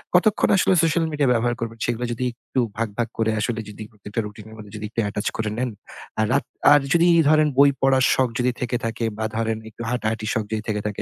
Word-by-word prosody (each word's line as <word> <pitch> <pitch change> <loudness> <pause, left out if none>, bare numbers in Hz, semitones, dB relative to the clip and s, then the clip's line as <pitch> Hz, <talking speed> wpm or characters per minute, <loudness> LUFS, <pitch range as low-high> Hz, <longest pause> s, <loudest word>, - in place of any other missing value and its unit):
কতক্ষণ 200 +4 +3
আসলে 190 - +3
social 165 0 +2
media 145 -2 +1
ব্যবহার 120 +1 +1
করবেন 115 0 -5
সেগুলা 120 +1 -1
যদি 125 +2 -3 0.2
একটু 130 - -1 0.2
ভাগ, 115 0 0
ভাগ 120 -1 0
করে 110 0 +1
আসলে 115 +1 -1
যদি 105 +1 -8
প্রত্যেকটা 105 +1 -6
routine 105 +1 -10
এর 110 - -12
মানে 105 -1 -10
যদি 105 0 -5
একটু 115 - -5
attach 105 - -2
করে 110 -1 -1
নেন। 125 0 -1 0.5
আর 110 - +3
রাত 140 - +2 0.3
আর 145 - +7
যদি 170 +1 +4 0.2
ধরেন 155 0 +5
বই 140 0 +7
পড়ার 135 -1 +4
শখ 130 -2 +2
যদি 125 +1 +2
থেকে 125 0 -1
থাকে 115 0 -2
বা 110 - -2
ধরেন 115 -1 -1
একটু 115 - -12
হাঁটাহাটি 110 -3 -2
শখ 110 - 0
যদি 110 -1 -1
থেকে 105 -1 -1
থাকে 105 - -4
115 Hz, 230 wpm, -23 LUFS, 110-130 Hz, 0.5 s, আর